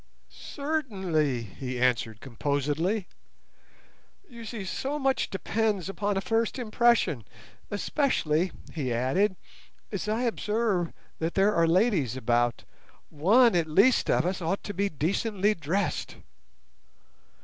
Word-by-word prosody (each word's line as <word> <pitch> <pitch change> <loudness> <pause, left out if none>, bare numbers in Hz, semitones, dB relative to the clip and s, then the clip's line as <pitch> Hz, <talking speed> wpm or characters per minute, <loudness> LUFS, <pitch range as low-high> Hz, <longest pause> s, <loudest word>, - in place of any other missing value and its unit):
"Certainly," 190 - -2
he 125 +5 -6
answered 115 -3 +1
composedly; 145 - -1 1.2
"you 235 -6 -10
see 215 -3 -5
so 275 +9 -3
much 270 -2 0
depends 200 -1 -1
upon 200 0 -1
a - - 0
first 225 +3 0
impression, 235 - +2 0.5
especially," 190 - 0 0.2
he 140 -6 -2
added, 135 - +1 0.6
"as 205 0 -3
I 225 +3 0
observe 215 -6 0 0.3
that 165 +1 -2
there 200 +2 +4
are 165 0 +3
ladies 165 - +2
about. 120 -1 +1 0.5
One 215 - +4
at 170 -2 +2
least 200 +11 +4
of - - +3
us 185 +1 -1
ought 175 +4 -1
to 205 - -5
be 200 +1 0
decently 200 +6 0
dressed." 175 +3 -2
190 Hz, 115 wpm, -27 LUFS, 150-220 Hz, 1.2 s, there